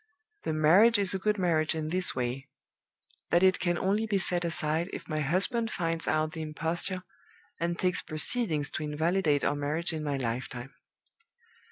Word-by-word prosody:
The -, -, -1 dB
marriage 180 Hz, +10 st, +5 dB
is 200 Hz, -2 st, +3 dB
a 190 Hz, -, -2 dB
good 210 Hz, +2 st, 0 dB
marriage 160 Hz, -4 st, +1 dB
in 155 Hz, -1 st, -3 dB
this 185 Hz, +2 st, +2 dB
way: 130 Hz, +2 st, -3 dB, 0.8 s
that 175 Hz, +2 st, +3 dB
it 185 Hz, 0 st, +4 dB
can 175 Hz, -1 st, 0 dB
only 205 Hz, +5 st, 0 dB
be 205 Hz, -2 st, 0 dB
set 180 Hz, -2 st, +1 dB
aside 165 Hz, +1 st, 0 dB
if -, -, -8 dB
my 155 Hz, -2 st, -3 dB
husband 195 Hz, -, +1 dB
finds 165 Hz, -4 st, -2 dB
out 155 Hz, 0 st, 0 dB
the 160 Hz, -, -7 dB
imposture, 165 Hz, +4 st, -2 dB, 0.6 s
and 170 Hz, +1 st, -2 dB
takes 180 Hz, -1 st, +1 dB
proceedings 155 Hz, -1 st, +1 dB
to 155 Hz, -, -4 dB
invalidate 155 Hz, 0 st, 0 dB
our -, -, +1 dB
marriage 150 Hz, +4 st, -1 dB
in 155 Hz, -1 st, -4 dB
my 145 Hz, -2 st, -2 dB
lifetime. 125 Hz, +1 st, -5 dB
165 Hz, 170 wpm, -28 LUFS, 150-185 Hz, 0.8 s, marriage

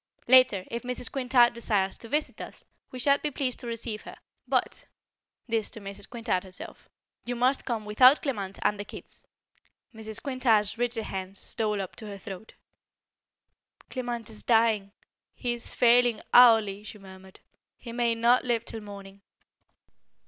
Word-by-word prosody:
Later, 255 Hz, -7 st, +5 dB
if 235 Hz, +1 st, -3 dB
Mrs. 250 Hz, -1 st, -4 dB
Quintard 250 Hz, -3 st, +3 dB
desires 205 Hz, -5 st, -1 dB
to 230 Hz, -, -9 dB
visit 300 Hz, +3 st, -2 dB
us -, -, -10 dB, 0.2 s
we 255 Hz, -, -9 dB
shall 280 Hz, +3 st, +3 dB
be 300 Hz, -, -2 dB
pleased 260 Hz, -3 st, -2 dB
to 240 Hz, -, -5 dB
receive 230 Hz, -2 st, -4 dB
her. -, -, -11 dB, 0.3 s
But" -, -, -1 dB, 0.6 s
this 225 Hz, -2 st, 0 dB
to -, -, -7 dB
Mrs. 200 Hz, 0 st, -8 dB
Quintard 230 Hz, -7 st, -2 dB
herself 185 Hz, -1 st, -9 dB, 0.3 s
"you 245 Hz, -, -4 dB
must 255 Hz, +3 st, +1 dB
come 225 Hz, -4 st, -3 dB
without 250 Hz, +7 st, +6 dB
Clement 200 Hz, -9 st, -3 dB
and 210 Hz, -, +1 dB
the -, -, -3 dB
kids." -, -, -12 dB, 0.7 s
Mrs. 220 Hz, 0 st, -4 dB
Quintard's 235 Hz, -7 st, +1 dB
rigid 235 Hz, -1 st, -1 dB
hand 190 Hz, -1 st, -6 dB
stole 210 Hz, -3 st, -2 dB
up 190 Hz, -2 st, -5 dB
to 220 Hz, -, -6 dB
her 200 Hz, -1 st, -7 dB
throat. 195 Hz, +1 st, -10 dB, 1.4 s
"Clement 240 Hz, -3 st, -4 dB
is 215 Hz, -, -5 dB
dying. 225 Hz, -4 st, +2 dB, 0.4 s
He 245 Hz, -2 st, -1 dB
is 240 Hz, 0 st, -6 dB
failing 240 Hz, -2 st, +4 dB
hourly," 220 Hz, -5 st, +6 dB
she 215 Hz, -, -9 dB
murmured. 190 Hz, -1 st, -14 dB, 0.4 s
"He 235 Hz, -, -9 dB
may 235 Hz, -1 st, +1 dB
not 235 Hz, +2 st, +3 dB
live 240 Hz, -3 st, 0 dB
till 225 Hz, -, -6 dB
morning." 200 Hz, -1 st, -11 dB
230 Hz, 155 wpm, -27 LUFS, 205-245 Hz, 1.4 s, without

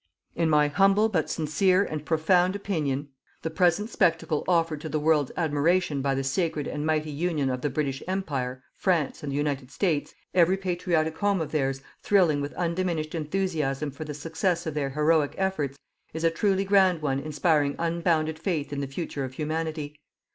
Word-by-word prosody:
In 165 Hz, -1 st, +1 dB
my 150 Hz, -1 st, +4 dB
humble 195 Hz, +7 st, +3 dB
but 165 Hz, -7 st, 0 dB
sincere 180 Hz, +5 st, +2 dB
and 155 Hz, -6 st, -4 dB
profound 175 Hz, +4 st, +2 dB
opinion, 150 Hz, -9 st, -2 dB, 0.3 s
the 160 Hz, -, -2 dB
present 180 Hz, +6 st, +2 dB
spectacle 165 Hz, -3 st, +1 dB
offered 165 Hz, -4 st, +1 dB
to 160 Hz, -, -5 dB
the 155 Hz, -, -1 dB
world's 150 Hz, -2 st, +2 dB
admiration 160 Hz, -1 st, +1 dB
by 135 Hz, 0 st, 0 dB
the 135 Hz, -, -1 dB
sacred 150 Hz, +1 st, -1 dB
and 150 Hz, +1 st, -3 dB
mighty 155 Hz, -1 st, 0 dB
union 150 Hz, -3 st, 0 dB
of 125 Hz, 0 st, -3 dB
the 145 Hz, -, 0 dB
British 135 Hz, -1 st, -2 dB
Empire, 135 Hz, -9 st, -3 dB
France 170 Hz, -7 st, 0 dB
and 145 Hz, -2 st, -4 dB
the -, -, -3 dB
United 140 Hz, -3 st, -1 dB
States, 160 Hz, -3 st, -1 dB, 0.2 s
every 180 Hz, +1 st, +4 dB
patriotic 175 Hz, -4 st, -1 dB
home 200 Hz, -2 st, +2 dB
of 160 Hz, -, -3 dB
theirs 135 Hz, -3 st, -1 dB, 0.2 s
thrilling 175 Hz, -8 st, +3 dB
with 145 Hz, +1 st, -5 dB
undiminished 170 Hz, -3 st, -1 dB
enthusiasm 155 Hz, -4 st, -1 dB
for 140 Hz, +3 st, -7 dB
the 150 Hz, -1 st, -6 dB
success 165 Hz, +3 st, -1 dB
of 160 Hz, -, -3 dB
their 145 Hz, -2 st, -1 dB
heroic 150 Hz, +1 st, +2 dB
efforts, 155 Hz, -8 st, -1 dB, 0.4 s
is 160 Hz, -, -3 dB
a 165 Hz, -, +4 dB
truly 195 Hz, +3 st, +1 dB
grand 190 Hz, -4 st, +3 dB
one 135 Hz, -2 st, 0 dB
inspiring 150 Hz, -1 st, +1 dB
unbounded 165 Hz, -2 st, 0 dB
faith 160 Hz, -5 st, -2 dB
in 140 Hz, -, -2 dB
the 140 Hz, -, -3 dB
future 140 Hz, 0 st, -4 dB
of 130 Hz, 0 st, -5 dB
Humanity. 155 Hz, 0 st, -3 dB
155 Hz, 175 wpm, -26 LUFS, 145-175 Hz, 0.4 s, my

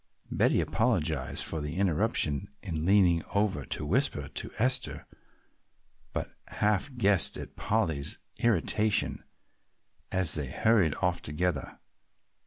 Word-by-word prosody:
Betty -, -, +3 dB
apologized 80 Hz, -, 0 dB
for 80 Hz, -, -3 dB
the 75 Hz, +2 st, -4 dB
interruption 90 Hz, -, +1 dB, 0.2 s
in 85 Hz, -4 st, -3 dB
leaning 95 Hz, -4 st, +4 dB
over 100 Hz, -9 st, +1 dB
to 75 Hz, -, -3 dB
whisper 90 Hz, -, 0 dB
to -, -, -4 dB
Esther, 125 Hz, +2 st, +1 dB, 1.1 s
but -, -, -4 dB
half 105 Hz, +6 st, -1 dB
guessed 100 Hz, -5 st, +4 dB
at -, -, -8 dB
Polly's 80 Hz, -10 st, -1 dB, 0.2 s
irritation 110 Hz, -1 st, +1 dB, 0.9 s
as 90 Hz, -4 st, +3 dB
they 75 Hz, -4 st, -2 dB
hurried 100 Hz, -, +2 dB
off 90 Hz, -1 st, +1 dB
together. 90 Hz, +5 st, -3 dB
90 Hz, 110 wpm, -29 LUFS, 80-110 Hz, 1.1 s, leaning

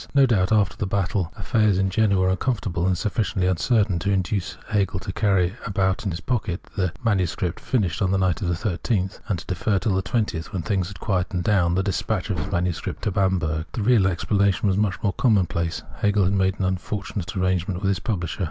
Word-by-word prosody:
No 140 Hz, -1 st, +7 dB
doubt, 100 Hz, -7 st, +2 dB
after 105 Hz, -3 st, +3 dB
the 100 Hz, -, -3 dB
battle, 95 Hz, -3 st, -1 dB
kfiffairs 105 Hz, 0 st, +2 dB
in 95 Hz, 0 st, +1 dB
Jena 105 Hz, -1 st, +3 dB
were 95 Hz, 0 st, +3 dB
uncomfortable, 95 Hz, -5 st, -1 dB
and 95 Hz, -1 st, +1 dB
sufficiently 100 Hz, -3 st, 0 dB
funcertain 100 Hz, 0 st, +2 dB
to 90 Hz, -, -2 dB
induce 95 Hz, -1 st, -1 dB
Hegel 95 Hz, -3 st, 0 dB
to 95 Hz, -, -6 dB
carry 95 Hz, -4 st, +2 dB
about 95 Hz, 0 st, 0 dB
in -, -, +1 dB
his 85 Hz, -1 st, -4 dB
pocket 100 Hz, -5 st, -2 dB
the 90 Hz, -3 st, 0 dB
MS. 95 Hz, -6 st, +1 dB, 0.2 s
finished 95 Hz, -, -1 dB
on 95 Hz, -, +2 dB
the 95 Hz, -, +2 dB
night 95 Hz, -4 st, +1 dB
of 95 Hz, -, -1 dB
the 85 Hz, -, +1 dB
13th, 95 Hz, +1 st, -1 dB
and 100 Hz, -, 0 dB
to 85 Hz, -, -9 dB
defer 100 Hz, +3 st, 0 dB
till 95 Hz, +2 st, 0 dB
the 95 Hz, -, +1 dB
20th, 100 Hz, -6 st, -2 dB
when 95 Hz, -5 st, -3 dB
things 95 Hz, -3 st, 0 dB
had 100 Hz, -1 st, -10 dB
quieted 90 Hz, -3 st, -1 dB
down, 90 Hz, -4 st, +2 dB
the 95 Hz, -, +1 dB
despatch 100 Hz, +1 st, -1 dB
of 90 Hz, -, -1 dB
his 75 Hz, -, -4 dB
MS. 90 Hz, -2 st, 0 dB, 0.2 s
to 105 Hz, -, -1 dB
Bamberg. 85 Hz, -5 st, 0 dB
The 110 Hz, -, -2 dB
real 110 Hz, -4 st, +4 dB
explanation 100 Hz, +4 st, +1 dB
was 95 Hz, -, +2 dB
much 100 Hz, -2 st, +1 dB
more 100 Hz, -, +1 dB
commonplace. 90 Hz, -8 st, +1 dB
Hegel 105 Hz, -1 st, +2 dB
had 95 Hz, +2 st, +2 dB
made 95 Hz, 0 st, +1 dB
an 95 Hz, -, -1 dB
unfortunate 95 Hz, 0 st, -3 dB
arrangement 90 Hz, 0 st, 0 dB
with 95 Hz, -, +2 dB
his 95 Hz, -2 st, +1 dB
publisher. 90 Hz, -7 st, -3 dB
95 Hz, 210 wpm, -24 LUFS, 90-105 Hz, 0.2 s, No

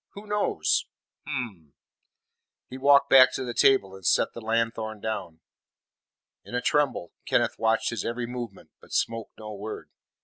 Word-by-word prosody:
Who 205 Hz, +1 st, -10 dB
knows? 205 Hz, -, 0 dB, 0.4 s
Hum!" 110 Hz, -, -5 dB, 1.0 s
He 130 Hz, -, -7 dB
walked 140 Hz, +1 st, +5 dB
back 130 Hz, -1 st, +8 dB
to 130 Hz, -, -3 dB
the 120 Hz, -, -4 dB
table 120 Hz, -9 st, +4 dB
and 95 Hz, 0 st, -12 dB
set -, -, +2 dB
the 115 Hz, -, -8 dB
lanthorn 115 Hz, -1 st, -1 dB
down. 100 Hz, -7 st, -5 dB, 1.0 s
In -, -, -8 dB
a 125 Hz, -, 0 dB
tremble, 145 Hz, -, +1 dB, 0.2 s
Kenneth -, -, +1 dB
watched 110 Hz, 0 st, +1 dB
his 115 Hz, -, -3 dB
every 120 Hz, +1 st, -3 dB
movement, 120 Hz, -4 st, -7 dB
but -, -, -14 dB
spoke 115 Hz, -1 st, -1 dB
no 110 Hz, -1 st, -8 dB
word. 105 Hz, +2 st, -7 dB
115 Hz, 150 wpm, -26 LUFS, 110-130 Hz, 1.0 s, back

